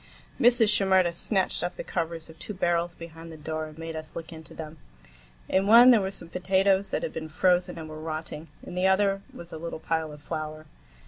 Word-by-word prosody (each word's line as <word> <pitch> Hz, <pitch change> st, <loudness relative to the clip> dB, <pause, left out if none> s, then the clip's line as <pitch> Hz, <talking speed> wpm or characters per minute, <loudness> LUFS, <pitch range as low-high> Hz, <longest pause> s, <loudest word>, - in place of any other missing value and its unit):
Mrs. 235 Hz, -2 st, +5 dB
Shimerda 190 Hz, -4 st, +3 dB
snatched 190 Hz, +2 st, +1 dB
off 175 Hz, -, -3 dB
the -, -, -4 dB
covers 165 Hz, -2 st, -3 dB
of 160 Hz, 0 st, -15 dB
two 210 Hz, -, -6 dB
barrels 175 Hz, -1 st, 0 dB
behind 165 Hz, 0 st, -10 dB
the 160 Hz, -, -9 dB
door, 155 Hz, +1 st, -4 dB
and 155 Hz, 0 st, -13 dB
made 165 Hz, 0 st, -6 dB
us 155 Hz, 0 st, -7 dB
look 165 Hz, 0 st, -7 dB
into 160 Hz, 0 st, -11 dB
them. 155 Hz, -1 st, -8 dB, 0.7 s
In 190 Hz, +1 st, +2 dB
one 240 Hz, +4 st, +9 dB
there 230 Hz, -4 st, +5 dB
were 190 Hz, -, -1 dB
some 195 Hz, -, -7 dB
potatoes 190 Hz, +2 st, +2 dB
that -, -, -2 dB
had -, -, -3 dB
been 160 Hz, -1 st, -5 dB
frozen 180 Hz, +3 st, +2 dB
and 160 Hz, -1 st, -6 dB
were 155 Hz, 0 st, -8 dB
rotting, 155 Hz, 0 st, -5 dB, 0.2 s
in -, -, -8 dB
the 180 Hz, +1 st, +2 dB
other 195 Hz, 0 st, +3 dB
was 170 Hz, 0 st, -11 dB
a 160 Hz, -, -7 dB
little 170 Hz, +1 st, -5 dB
pile 160 Hz, -1 st, -1 dB
of 150 Hz, -, -11 dB
flour. 155 Hz, 0 st, -5 dB
170 Hz, 215 wpm, -27 LUFS, 160-190 Hz, 0.7 s, one